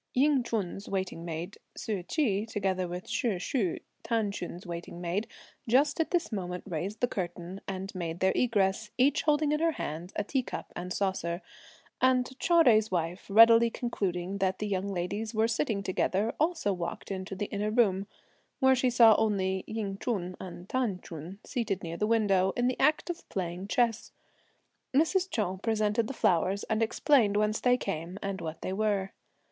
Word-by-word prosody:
Ying 280 +1 +4
Ch'un's 205 -4 -3
waiting 190 -3 -3
maid, 170 +4 -5 0.2
Ssu 205 -4 -2
Chi, 220 - 0
together 190 -3 0
with 180 +1 -6
Shih 230 -8 0
Shu, 190 - -1 0.3
T'an 225 -3 0
Ch'un's 180 -1 -6
waiting 170 0 -6
maid, 180 +5 -2 0.4
just 285 +6 +3
at 325 - +1
this 345 -6 0
moment 180 -3 -4
raised 190 +5 -4
the 245 - +3
curtain, 180 -1 -5
and 190 0 -5
made 170 -2 -4
their 190 0 +3
egress, 210 -3 +1
each 280 +3 +3
holding 300 -1 +2
in 300 - +1
her 330 0 +2
hand 165 - -5
a - - 0
tea 265 +6 0
cup - - -7
and 180 +1 -5
saucer; 185 -3 -1 0.6
and 255 -1 +4
Chou 340 -2 +5
Jui's 220 -4 +5
wife 175 0 -2
readily 230 +2 +7
concluding 195 -5 -3
that 190 -1 +1
the 210 - -3
young 195 -1 -1
ladies 200 +4 -3
were 220 +1 +3
sitting 225 -3 -1
together 195 +3 0
also 315 - +1
walked 175 +2 -5
into 190 0 -4
the 205 - -2
inner 205 +1 0
room, 200 -4 +2 0.5
where 265 -2 +5
she 255 0 +2
only 210 -4 +5
saw - - -10
Ying 200 -3 -3
Ch'un 185 -7 -2
and 180 0 -8
T'an 235 -7 -1
Ch'un 165 +4 -8
seated 210 -6 -2
near 170 0 -5
the 210 - 0
window, 195 -4 +3
in 245 - +2
the 255 0 0
act 305 +5 +3
of 345 - -11
playing 180 0 -4
chess. 230 0 +1 0.8
Mrs. 360 +6 +3
Chou 190 - -1
presented 215 0 +1
the 270 - -5
flowers 185 +2 +2
and 220 0 -1
explained 225 -2 +3
whence 210 +1 +1
they 250 0 +3
came, 180 -3 -4
and 195 -1 -3
what 160 -1 -6
they 185 - -2
were. 200 -2 0
200 Hz, 175 wpm, -29 LUFS, 185-235 Hz, 0.8 s, readily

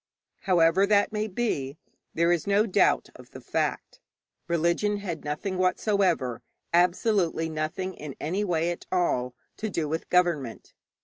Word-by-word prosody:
However 175 +2 +4
that 205 0 +3
may 215 0 -1
be, 185 - -2 0.4
there 170 +1 +3
is 175 +2 0
no 200 +2 +3
doubt 205 -2 +2
of - - -14
the - - -10
fact. - - -3 0.5
Religion 170 +5 +1
had 180 -6 -5
nothing 180 +6 -3
whatever 185 - +1 0.3
absolutely 175 -1 +2
nothing 160 +4 -3
in 150 -5 -8
any 185 +7 -1
way 170 -3 0
at 175 - -8
all 125 -9 0 0.2
to 220 - -3
do 165 -5 -2
with 160 +2 -4
government. 170 -10 0
175 Hz, 140 wpm, -27 LUFS, 160-200 Hz, 0.5 s, However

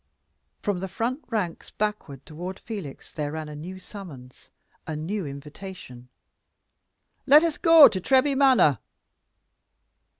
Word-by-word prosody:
From 200 -3 -1
the 190 - -4
front 240 - -3
ranks 205 -8 -3
backward 210 -11 -4
toward 175 +5 -7
Felix 200 - -8
there 150 -1 -4
ran 155 -1 -5
a 150 - -8
new 175 +6 -8
summons 165 - -12 0.4
a 160 - -4
new 170 +3 -4
invitation. 140 -3 -10 1.2
"Let 295 +4 +8
us 330 -3 -1
go 330 -3 +9
to 185 - -3
Treby 270 +6 +3
Manor!" 260 - +4
185 Hz, 125 wpm, -25 LUFS, 150-225 Hz, 1.2 s, go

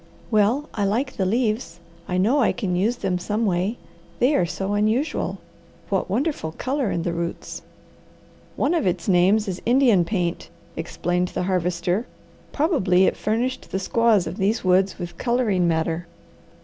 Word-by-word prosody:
"Well 225 +8 +2
I 205 - -1
like 245 +7 0
the 190 - +1
leaves. 215 -5 -1 0.3
I 180 - -1
know 225 +10 +3
I 240 - +3
can 195 -7 -2
use 210 +7 +1
them 180 -6 -2
some 215 +5 -1
way. 190 +4 0 0.4
They 255 +5 +3
are 175 - +2
so 195 +3 -3
unusual. 220 +9 0 0.5
What 195 -2 0
wonderful 235 - -1
colour 265 - -1
in 170 - -1
the 170 - -1
roots!" 170 0 -5 0.9
"One 290 - +1
of 325 - +1
its 175 -2 -1
names 195 +4 +3
is 185 -2 -4
Indian 240 -6 +4
paint," 175 -2 -2 0.3
explained 175 +2 -1
the 180 - -3
Harvester. 180 +3 0 0.4
"Probably 200 - +3
it - - +1
furnished 240 +5 -2
the - - -2
squaws 215 0 +2
of 170 +4 -5
these 210 +3 0
woods 185 +1 +2
with 175 -2 -7
colouring 230 -8 +1
matter. 165 +1 -1
195 Hz, 160 wpm, -23 LUFS, 180-235 Hz, 0.9 s, Indian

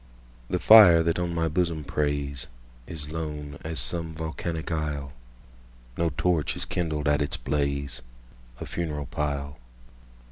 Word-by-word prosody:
The - - +1
fire 95 -7 +9
that 85 +1 0
on 90 -1 -1
my 80 0 +1
bosom 85 -1 0
preysIs 70 -1 -4
lone 75 -2 -5
as 80 -1 -3
some 80 +6 -2
volcanic 80 +1 -4
isle; 75 -4 -3 0.8
No 85 -1 +1
torch 85 -4 +1
is - - -3
kindled 80 -4 -2
at 75 0 +3
its 75 - -1
blaze—A - - -4
funeral 75 -4 -3
pile. 70 -2 -3
75 Hz, 120 wpm, -26 LUFS, 70-80 Hz, 0.8 s, fire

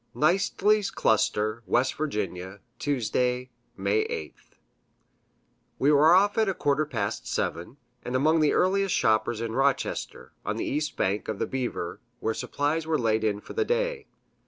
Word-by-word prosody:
Kneistley's 195 +5 +2
Cluster, 110 +1 +1
W. - - +5 0.6
Va., 95 +3 -9 0.2
Tuesday, 125 -1 -1 0.3
May 100 +3 +1
8th. 80 - -8 1.2
We 140 +3 +3
were 155 +4 +6
off 205 +3 +3
at 220 -2 +3
a 190 - -1
quarter 145 +1 +1
past 110 -7 -3
seven, 85 +11 -3 0.3
and 125 - -4
among 155 +5 +3
the 150 -2 +3
earliest 195 +1 +2
shoppers 110 0 +1
in 115 -1 -3
Rochester, 135 +2 -1
on - - -2
the - - -2
east 150 +1 -2
bank 100 +3 0
of 110 - -3
the - - -1
Beaver, 125 -9 -4 0.2
where 110 - -1
supplies 150 +7 -2
were 160 -1 +2
laid 110 -1 +1
in 105 -1 0
for - - -10
the 440 - +1
day. 480 -1 -1
135 Hz, 155 wpm, -27 LUFS, 110-165 Hz, 1.2 s, were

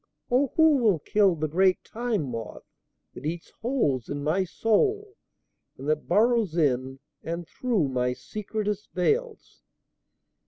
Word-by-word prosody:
(O 260 +1 +3
who 320 -2 +5
will 220 -8 +3
kill 195 +3 +2
the 155 0 -2
great 185 +4 +2
Time 230 -6 -2
Moth 115 -5 -6 0.5
that - - -10
eats 165 +3 -4
holes 150 - 0
in 145 0 -4
my 165 +6 +1
soul 400 - 0 0.6
and 135 - -8
that 155 0 0
burrows 220 -5 +2
in 135 -4 +1 0.2
and 170 0 -5
through 220 - 0
my 125 -1 0
secretest 210 - -4
veils!) 440 - -1
190 Hz, 130 wpm, -26 LUFS, 150-235 Hz, 0.6 s, who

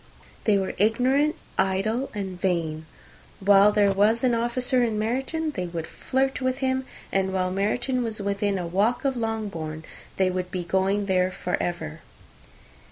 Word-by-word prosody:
They 210 -2 +4
were 190 -1 -1
ignorant, 255 +8 +3 0.2
idle, 195 +7 +1
and 190 -3 -5
vain. 160 -4 -1 0.5
While 200 +1 +6
there 205 -1 +4
was 210 +5 +3
an 250 -2 +3
officer 245 +2 +1
in 225 -3 0
Meryton, 270 +9 -1
they 180 -9 -3
would 170 -2 -4
flirt 265 +7 -1
with 255 0 0
him; 260 -1 -1 0.2
and 190 0 +1
while 185 -1 0
Meryton 240 +7 0
was 220 -2 -3
within 200 0 0
a 180 - -3
walk 205 +10 +1
of 270 -1 +1
Longbourn, 200 -9 -3 0.3
they 190 -1 +3
would 180 0 -3
be 180 -1 -3
going 190 +3 +1
there 185 -1 +2
for 180 -1 -2
ever. 160 -3 -3
205 Hz, 160 wpm, -25 LUFS, 185-240 Hz, 0.5 s, While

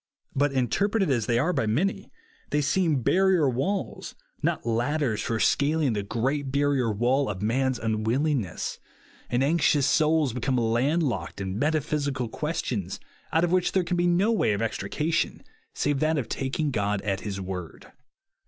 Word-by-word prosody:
But, 145 +1 +2
inter 135 - +1
preted 200 -7 +1
as 120 -5 0
they 120 - +2
are 160 +9 +1
by 110 - 0
many, 195 - 0 0.4
they 150 - +1
seem 150 -2 +1
barrier 185 -3 +3
walls, 140 +11 -2 0.3
rot - - -1
ladders 120 +1 0
for 115 -1 -2
scaling 145 0 +2
the 105 - -1
02 - - -9
OOD*S - - -20
CHARACTER 115 - -4
great 135 +3 0
bamor 135 -6 +1
wall 130 +4 +2
of 100 -1 -4
man's 130 +3 +1
nnwillhiifness; 115 - -1 0.5
and 125 +2 +1
anxious 145 -2 +3
souls 155 -4 +2
become 130 +1 -1
land 120 +8 +1
locked 130 -7 -3
in 95 +1 -3
metaphysical 145 -4 0
questions, 110 - -3 0.3
out 160 - +2
of 175 - +1
which 180 -1 +2
there 190 - +2
can 175 +1 -1
be 175 0 +2
no 185 +6 +3
way 210 - +2
of 100 - -2
extrication 150 +9 -1 0.3
save 145 -2 0
that 155 +1 +1
of 135 - -2
taking 140 +3 -2
God 105 -3 -1
at 100 -2 -1
his 100 -2 -4
word. 90 -3 -7
135 Hz, 170 wpm, -26 LUFS, 115-155 Hz, 0.5 s, barrier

